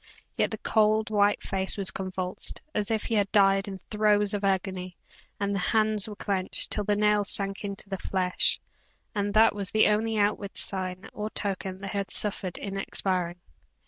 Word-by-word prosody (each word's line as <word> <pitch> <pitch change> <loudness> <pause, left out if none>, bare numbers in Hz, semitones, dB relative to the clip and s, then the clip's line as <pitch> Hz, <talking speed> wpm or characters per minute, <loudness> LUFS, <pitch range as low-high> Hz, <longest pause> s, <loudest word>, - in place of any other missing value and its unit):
Yet - - +1
the - - -5
cold, 215 0 +2
white 205 -1 +2
face 190 +1 -1
was 195 -2 0
convulsed, 185 -1 -2
as 210 -1 -1
if 220 -1 0
he - - -3
had 205 -2 +1
died 195 -1 +4
in 195 -1 -6
throes 210 -1 +2
of 205 0 -2
agony, 185 -2 -1 0.4
the 200 0 -1
hands 215 +2 +4
were 210 - -7
clenched, 195 -2 -2
till 210 - +1
the 205 - +2
nails 210 -1 +2
sank 195 0 +1
into 200 0 -5
the 195 -1 -4
flesh; 185 -1 +1 0.5
and 205 -1 -1
that 220 0 +6
was 200 -2 -2
the 215 0 +4
only 220 +1 0
outward 205 -1 0
sign 185 0 -2
or 210 0 -4
token 190 -2 -3
that 195 -1 -5
he 205 - -3
had 195 - -4
suffered 195 -3 -1
in 195 -1 -5
expiring. 180 -3 -2
200 Hz, 180 wpm, -27 LUFS, 190-210 Hz, 0.5 s, that